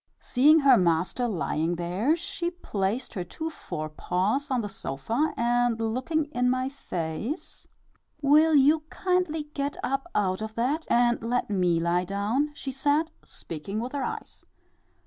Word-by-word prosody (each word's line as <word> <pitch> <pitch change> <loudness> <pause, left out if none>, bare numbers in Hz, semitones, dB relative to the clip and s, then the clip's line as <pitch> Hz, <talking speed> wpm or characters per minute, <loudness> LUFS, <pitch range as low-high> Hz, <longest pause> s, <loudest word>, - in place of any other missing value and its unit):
Seeing 300 +5 +5
her 270 -3 +7
master 175 +7 +1
lying 170 -4 -1
there, 180 - +1
she 340 0 -3
placed 235 - -3
her 185 - -3
two 320 - -5
forepaws 185 - -2
on 255 -3 +1
the 210 - -3
sofa, 205 - -2
and 240 -1 +2
looking 255 +8 0
in 250 -1 +1
my 255 +1 0
face, 215 - -5 0.5
"Will 305 +2 +5
you 290 +3 +5
kindly 360 -4 0
get 285 0 -2
up 275 +5 -2
out 190 -1 +1
of 220 0 -5
that 280 +7 0
and 240 0 +3
let 235 -1 -1
me 180 -4 +2
lie 175 +2 +1
down," 205 +10 0
she 275 - -5
said, 290 +4 +1
speaking 185 +6 -6
with 245 +3 -4
her 285 - -3
eyes. - - -5
245 Hz, 145 wpm, -27 LUFS, 190-290 Hz, 0.5 s, her